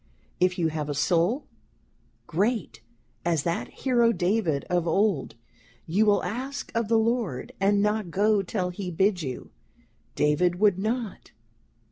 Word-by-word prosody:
If 180 Hz, +1 st, +2 dB
you 165 Hz, -2 st, +1 dB
have 155 Hz, -1 st, -4 dB
a 145 Hz, -, -2 dB
Soul, 175 Hz, -, +1 dB, 0.8 s
great 195 Hz, -, -1 dB, 0.4 s
as 165 Hz, -4 st, +1 dB
that 170 Hz, 0 st, -1 dB
Hero 240 Hz, -3 st, +2 dB
David 180 Hz, -7 st, 0 dB
of 175 Hz, -1 st, -1 dB
old, 195 Hz, -3 st, +1 dB, 0.5 s
you 200 Hz, +7 st, +2 dB
will 205 Hz, -1 st, +3 dB
ask 265 Hz, +5 st, -4 dB
of 230 Hz, -1 st, 0 dB
the 225 Hz, +1 st, +3 dB
Lord, 220 Hz, -, -1 dB
and 200 Hz, +1 st, +3 dB
not 210 Hz, -3 st, 0 dB
go 205 Hz, +3 st, +2 dB
till 185 Hz, -1 st, -2 dB
he 180 Hz, 0 st, -5 dB
bid 190 Hz, +2 st, +1 dB
you: 130 Hz, -4 st, -6 dB, 0.6 s
David 170 Hz, +4 st, +2 dB
would 200 Hz, -3 st, +3 dB
not. 220 Hz, +1 st, -3 dB
195 Hz, 140 wpm, -26 LUFS, 170-220 Hz, 0.8 s, will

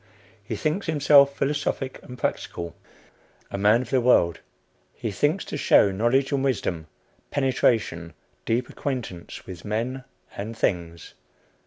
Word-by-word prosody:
He -, -, -4 dB
thinks 155 Hz, +6 st, -1 dB
himself 140 Hz, -2 st, +5 dB
philosophic 140 Hz, -2 st, -2 dB
and 125 Hz, -, -10 dB
practical, 85 Hz, -7 st, -3 dB, 0.8 s
a -, -, -3 dB
man 105 Hz, +5 st, +4 dB
of 115 Hz, -, -12 dB
the 130 Hz, -, +3 dB
world; 85 Hz, -9 st, +4 dB, 0.6 s
he 110 Hz, -, -4 dB
thinks 145 Hz, -, 0 dB
to -, -, -5 dB
show 100 Hz, -7 st, +5 dB
knowledge 120 Hz, +8 st, +1 dB
and 140 Hz, -1 st, +1 dB
wisdom, 95 Hz, -, -1 dB, 0.4 s
penetration, 115 Hz, -, 0 dB, 0.3 s
deep 120 Hz, +2 st, 0 dB
acquaintance 120 Hz, -11 st, -5 dB
with 90 Hz, -3 st, -9 dB
men 120 Hz, +5 st, -2 dB, 0.3 s
and 110 Hz, +3 st, -6 dB
things. 85 Hz, -5 st, -2 dB
120 Hz, 130 wpm, -25 LUFS, 95-135 Hz, 0.8 s, himself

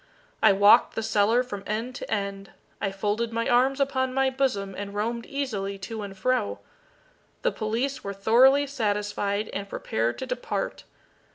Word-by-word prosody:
I -, -, +7 dB
walked 205 Hz, +1 st, +5 dB
the 225 Hz, -, -2 dB
cellar 220 Hz, +3 st, +3 dB
from 205 Hz, -6 st, -6 dB
end 225 Hz, +4 st, -2 dB
to -, -, -8 dB
end. 200 Hz, -2 st, -3 dB, 0.3 s
I 195 Hz, -, 0 dB
folded 210 Hz, +4 st, -1 dB
my 230 Hz, 0 st, -1 dB
arms 260 Hz, +3 st, +3 dB
upon 260 Hz, -2 st, 0 dB
my 270 Hz, 0 st, +2 dB
bosom, 230 Hz, -8 st, -1 dB
and 200 Hz, 0 st, -6 dB
roamed 230 Hz, +3 st, -2 dB
easily 215 Hz, -9 st, -3 dB
to 215 Hz, +3 st, -6 dB
and 195 Hz, -1 st, -7 dB
fro. 190 Hz, -, 0 dB, 0.9 s
The -, -, +2 dB
police 245 Hz, +5 st, -2 dB
were 200 Hz, -, -3 dB
thoroughly 245 Hz, +8 st, +5 dB
satisfied, 205 Hz, -4 st, -1 dB
and 200 Hz, 0 st, -5 dB
prepared 115 Hz, -6 st, -1 dB
to -, -, -4 dB
depart. -, -, -3 dB
215 Hz, 160 wpm, -26 LUFS, 200-255 Hz, 0.9 s, I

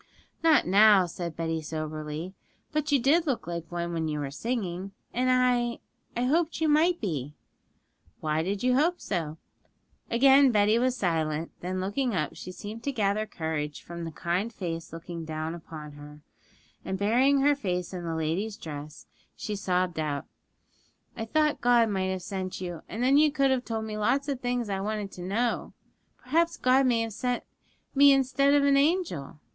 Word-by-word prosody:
'Not 320 Hz, -3 st, +5 dB
now,' 200 Hz, 0 st, +6 dB
said 170 Hz, -1 st, -5 dB
Betty 165 Hz, -1 st, -2 dB
soberly; 155 Hz, +2 st, -5 dB, 0.4 s
'but 300 Hz, -1 st, -1 dB
you 285 Hz, -, +5 dB
did 310 Hz, +7 st, +3 dB
look 265 Hz, -4 st, -1 dB
like 170 Hz, -1 st, -5 dB
one 170 Hz, 0 st, -3 dB
when 160 Hz, -1 st, -1 dB
you 150 Hz, -1 st, -2 dB
were 140 Hz, -2 st, -3 dB
singing, 195 Hz, -, -3 dB, 0.2 s
and 255 Hz, +1 st, +1 dB
I 250 Hz, -2 st, +2 dB, 0.4 s
I -, -, +1 dB
hoped 320 Hz, +5 st, +1 dB
you 320 Hz, -, +2 dB
might 325 Hz, +4 st, +3 dB
be.' 150 Hz, -, -3 dB, 0.8 s
'Why 155 Hz, 0 st, 0 dB
did 195 Hz, +5 st, -2 dB
you 250 Hz, 0 st, +3 dB
hope 325 Hz, +7 st, +2 dB
so?' 165 Hz, -5 st, -3 dB, 0.7 s
Again 270 Hz, +3 st, +6 dB
Betty 210 Hz, +1 st, +3 dB
was 255 Hz, +1 st, +1 dB
silent; 160 Hz, -5 st, -1 dB
then, 185 Hz, +1 st, -3 dB
looking 210 Hz, +5 st, -1 dB
up, 155 Hz, -4 st, -1 dB
she 185 Hz, -, -8 dB
seemed 210 Hz, +4 st, -8 dB
to 280 Hz, -, 0 dB
gather 215 Hz, -3 st, 0 dB
courage 160 Hz, -5 st, -4 dB
from 170 Hz, 0 st, -7 dB
the 165 Hz, -, -5 dB
kind 180 Hz, +8 st, -2 dB
face 165 Hz, -6 st, -5 dB
looking 165 Hz, +1 st, -7 dB
down 155 Hz, 0 st, -4 dB
upon 155 Hz, -3 st, -9 dB
her, 145 Hz, 0 st, -12 dB, 0.6 s
and 190 Hz, -, -3 dB
burying 255 Hz, +8 st, +3 dB
her 290 Hz, +1 st, +5 dB
face 180 Hz, -9 st, -3 dB
in 180 Hz, -1 st, -5 dB
the 165 Hz, -1 st, -3 dB
lady's 175 Hz, +7 st, -2 dB
dress, 150 Hz, -4 st, -8 dB, 0.3 s
she 210 Hz, -, -4 dB
sobbed 180 Hz, -3 st, 0 dB
out, 145 Hz, -2 st, -2 dB, 0.9 s
'I 225 Hz, -, -4 dB
thought 300 Hz, +5 st, +1 dB
God 240 Hz, -2 st, +4 dB
might 190 Hz, -2 st, -1 dB
have 185 Hz, -1 st, -3 dB
sent 185 Hz, -1 st, -4 dB
you; 175 Hz, -3 st, -5 dB
and 225 Hz, +3 st, -3 dB
then 270 Hz, +3 st, +5 dB
you 300 Hz, 0 st, +5 dB
could 275 Hz, -2 st, +2 dB
have 255 Hz, -1 st, 0 dB
told 225 Hz, -1 st, -3 dB
me 215 Hz, -1 st, -5 dB
lots 265 Hz, +7 st, +1 dB
of 275 Hz, -3 st, -2 dB
things 245 Hz, -2 st, -1 dB
I 195 Hz, -1 st, -2 dB
wanted 205 Hz, 0 st, -3 dB
to 180 Hz, -, -9 dB
know.' 220 Hz, +7 st, -1 dB, 0.4 s
'Perhaps 330 Hz, +6 st, +1 dB
God 260 Hz, +1 st, +4 dB
may 235 Hz, -2 st, +2 dB
have 225 Hz, -1 st, -3 dB
sent 245 Hz, +3 st, -2 dB, 0.5 s
me 280 Hz, 0 st, +7 dB
instead 275 Hz, +1 st, +3 dB
of 285 Hz, -, +4 dB
an 280 Hz, -1 st, +4 dB
angel. 275 Hz, -, 0 dB
205 Hz, 180 wpm, -28 LUFS, 165-255 Hz, 0.9 s, me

